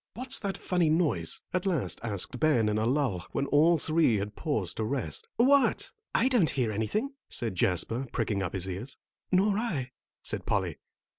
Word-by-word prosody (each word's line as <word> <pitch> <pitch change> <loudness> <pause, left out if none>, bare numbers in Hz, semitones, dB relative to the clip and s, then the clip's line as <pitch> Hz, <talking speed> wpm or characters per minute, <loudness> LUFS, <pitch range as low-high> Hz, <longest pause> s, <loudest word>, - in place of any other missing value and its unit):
"What's 260 +2 +2
that 195 -2 -3
funny 180 -3 +1
noise?" 150 - +1
at 185 +2 0
last 170 -9 -1
asked 115 +3 -3
Ben 135 -9 +3
in 105 0 0
a 110 - +1
lull, 125 - 0
when 140 - 0
all 160 +4 +4
three 155 -5 +2
had 105 +1 -3
paused 110 - -2
to 110 - -1
rest. 115 - -2
"What? 275 +3 +3 0.2
I 235 - +4
don't 240 -11 +3
hear 125 -5 0
anything," 210 - -2 0.2
said 115 -4 -1
Jasper, 95 +8 +1
pricking 100 -3 -1
up 90 - -3
his 95 -1 -1
ears. 95 +9 -5 0.3
"Nor 195 +2 +3
I," 145 - -2 0.3
said - - -3
Polly. - - -1
140 Hz, 175 wpm, -29 LUFS, -, 0.3 s, all